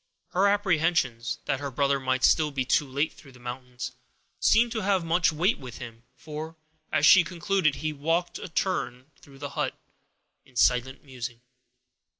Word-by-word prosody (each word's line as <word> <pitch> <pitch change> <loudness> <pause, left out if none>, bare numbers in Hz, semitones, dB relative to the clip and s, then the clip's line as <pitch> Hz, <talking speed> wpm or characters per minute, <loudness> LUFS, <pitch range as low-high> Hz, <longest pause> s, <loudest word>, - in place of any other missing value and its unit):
Her 190 +3 +3
apprehensions, 165 - +1
that 135 - 0
her 140 -1 -4
brother 140 +1 +1
might 130 0 -1
still 155 -1 +4
be 135 -3 -2
too 140 +3 +2
late 140 +4 -1
through 135 -3 -16
the 125 - -16
mountains, 125 0 -6 0.5
seemed 230 +2 +4
to 225 -2 -2
have 190 -3 +1
much 165 +1 +3
weight 175 +8 +1
with 130 -3 -9
him, 115 -1 -10
for, 155 +1 -7 0.4
as 155 -1 +3
she 175 +2 +8
concluded, 175 -2 0
he 155 0 -3
walked 165 +5 -1
a - - -7
turn 165 -8 -1
or - - -30 0.2
two 140 - -17
across - - -15
the 145 - -4
hut, - - -3 0.6
in 130 - -24
silent 125 +2 +2
musing. 125 -3 -7
145 Hz, 175 wpm, -27 LUFS, 130-170 Hz, 0.6 s, she